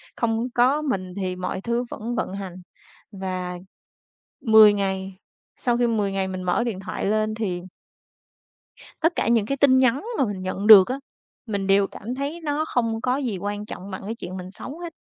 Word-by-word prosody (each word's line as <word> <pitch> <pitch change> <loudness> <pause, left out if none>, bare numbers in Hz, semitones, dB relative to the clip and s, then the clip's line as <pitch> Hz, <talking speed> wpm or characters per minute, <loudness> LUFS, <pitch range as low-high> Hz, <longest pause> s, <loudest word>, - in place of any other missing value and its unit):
không 230 +1 0
có 260 +5 +3
mình 185 -11 -2
thì 185 -2 -2
mọi 185 +1 -4
thứ 235 +2 -1
vẫn 235 +3 -4
vận 190 - -2
hành. 195 -3 -6 0.6
Và 185 -2 -4 0.8
10 220 -2 +7
ngày, 190 -1 -3 0.4
sau 240 -1 0
khi 240 0 +2
10 210 -4 0
ngày 190 -1 -1
mình 185 -1 -5
mở 185 +6 +1
điện 205 -6 -3
thoại - - -5
lên 215 +1 +1
thì 185 -6 -3 1.4
tất 330 +2 +3
cả - - 0
những 230 -3 +3
cái 275 +4 -2
tin 260 -1 +5
nhắn 260 - +3
mà 270 - +3
mình 200 -4 -4
nhận 190 +3 -3
được 200 -4 +10
á, 260 +2 -3 0.5
mình 200 -2 -2
đều 195 0 +4
cảm 235 +5 -7
thấy 290 +5 -4
nó 300 +1 -1
không 230 -4 -1
có 255 +1 +1
gì 240 -9 -2
quan 205 +2 -4
trọng 195 -1 -8
bằng 190 - -6
cái 225 +2 -4
chuyện 185 -3 -7
mình 185 +1 -8
sống 285 +10 -9
hết. 340 -2 -7
215 Hz, 195 wpm, -24 LUFS, 190-245 Hz, 1.4 s, được